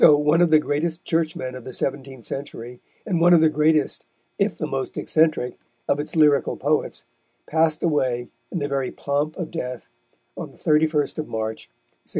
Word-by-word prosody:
So 150 - +8
one 150 +3 +3
of 175 - +5
the 155 - +7
greatest 160 +3 -1
Churchmen 155 -6 -1
of 130 -1 -8
the 130 - -7
seventeenth 135 -2 -4
century, 125 -3 -6 0.3
and 180 -6 0
one 175 +1 +7
of - - +6
the 160 - +5
greatest, 155 0 +1 0.3
if - - +1
the - - -2
most - - -3
eccentric, 155 -6 +1 0.3
of 140 - +1
its 150 - -4
lyrical 150 -3 +3
poets - - 0 0.4
passed 160 0 +1
away 130 -7 0 0.2
in - - -3
the 145 -3 -1
very 135 -2 -1
pomp 145 +2 -2
of 175 -4 -4
death, 125 -7 -5 0.4
on - - -6
the - - -20
31st 155 -1 +1
of 155 - -3
March, 110 0 -4 0.4
1631. - - -31
150 Hz, 180 wpm, -23 LUFS, 135-160 Hz, 0.4 s, So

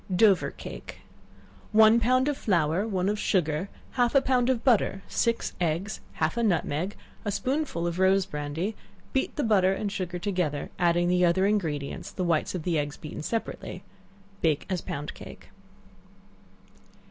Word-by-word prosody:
Dover 200 -1 +4
Cake. - - -9 0.7
One 220 +1 +7
pound 255 +3 +3
of 295 - +1
flour, 175 - +1
one 190 -3 0
of 210 +1 0
sugar, 175 -2 0 0.2
half 245 0 +1
a 275 - +7
pound 255 -2 +2
of 245 -3 +1
butter, 225 -5 +2
six 230 -1 0
eggs, 175 +6 -1
half 160 +8 -1
a - - +2
nutmeg, 180 -2 0 0.3
a 205 - -1
spoonful 260 - -1
of 170 +1 -2
rose 190 0 +4
brandy; 150 +8 -3 0.4
beat 265 - 0
the 295 - -1
butter 195 -4 +4
and 205 +1 -3
sugar 180 -3 -3
together, 180 -6 -2
adding 175 0 +3
the 180 0 +3
other 180 +2 +3
ingredients, 160 -9 -1
the 185 - -3
whites 170 0 +1
of 175 - -4
the 165 -3 +1
eggs 145 0 -3
beaten 155 - -7
separately; 225 +8 -4 0.6
bake 155 -3 +1
as 180 -3 0
pound 145 +1 -5
cake. - - -12
190 Hz, 160 wpm, -27 LUFS, 170-220 Hz, 0.7 s, One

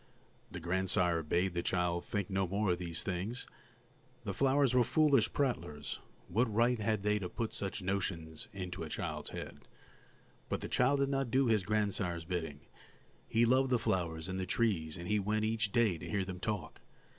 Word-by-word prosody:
The 90 - -6
grandsire 90 -1 +1
bade 85 +4 +1
the 85 - 0
child 85 -1 0
think 100 -3 -2
no 95 -1 0
more 100 +1 +1
of 90 - 0
these 85 -2 -1
things; 95 +6 -3 0.8
the - - -3
flowers 135 -1 +3
were 125 -1 +5
foolish 145 -4 +4
prattlers, 75 - -2 0.3
what 115 +5 +1
right 120 +2 +3
had 110 -1 0
they 105 0 +2
to 90 -3 -4
put 115 +4 -3
such 100 -1 -3
notions 90 -5 -2
into 90 -2 -5
a 80 - -4
child's - - -4
head? - - -7 0.9
But - - -1
the - - -3
child 140 +3 +3
did 140 - +2
not 135 -2 0
do 130 +3 +3
his 110 -4 +3
grandsire's 100 -5 0
bidding; 80 -5 -3 0.7
he 115 +1 +3
loved 130 +2 +4
the 125 - +4
flowers 85 -6 -1
and 95 0 -3
the 95 - -2
trees, 90 -8 0
and 85 0 -6
he 105 +1 +2
went 105 +2 0
each 110 -1 0
day 110 -8 +3
to - - -7
hear 100 -2 0
them 95 -1 -6
talk. 105 -1 -3
100 Hz, 185 wpm, -34 LUFS, 90-115 Hz, 0.9 s, were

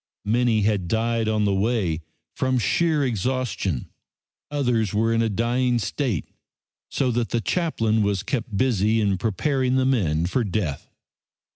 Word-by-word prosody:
Many 115 0 +2
had 100 -4 +1
died 115 +2 0
on 105 -1 +1
the 100 - +2
way 95 -5 0 0.3
from 130 0 +1
sheer 150 +7 +2
exhaustion, 120 - -2 0.6
others 120 -8 0
were 115 +2 +2
in 115 - +2
a 115 - +1
dying 120 +3 +1
state, 120 - -2 0.6
so 130 -2 0
that 120 -1 -1
the 120 - 0
chaplain 115 -7 0
was 100 -2 0
kept 115 -5 -3
busy 110 -3 +2
in 100 -3 +1
preparing 130 +5 0
the 130 0 +2
men 85 - +1
for 120 +8 0
death. 95 -8 -3
115 Hz, 145 wpm, -24 LUFS, 100-125 Hz, 0.6 s, Many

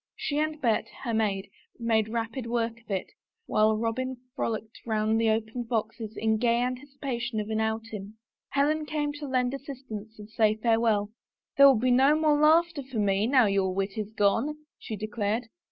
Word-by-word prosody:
She 290 0 -2
and 310 0 -1
Bet, 230 -6 +1 0.2
her 235 -3 -2
maid, 200 -3 0 0.3
made 225 -2 +1
rapid 230 +2 -3
work 230 0 -1
of 225 - -31
it, 190 -2 -2 0.3
while 215 0 +3
Robin 250 +3 -2 0.2
frolicked 220 -4 -3
round 220 0 +1
the 225 - +3
opened 225 +2 -2
boxes 220 -1 -3
in 220 0 +1
gay 235 +1 +2
anticipation 250 -2 -3
of 210 0 -4
an 220 - 0
outing. 220 -2 -4 0.3
Helen 300 +2 +1
came 295 -1 -1
to 290 0 -7
lend 255 -1 +1
assistance 255 -6 -8
and 210 -1 -10
say 215 -1 +2
farewell. 220 -2 +1 0.2
" - - -66
There 280 0 +9
will 270 - +7
be 250 +3 +2
no 270 +5 +5
more 310 -1 +4
laughter 320 +1 +4
for 260 -3 -7
me 205 0 +2
now 255 -2 +5
your 195 -2 +1
wit 195 0 -2
is 215 -1 -4
gone," 225 +8 +1 0.2
she 220 - -5
declared. 215 +2 -2
230 Hz, 180 wpm, -28 LUFS, 215-260 Hz, 0.3 s, There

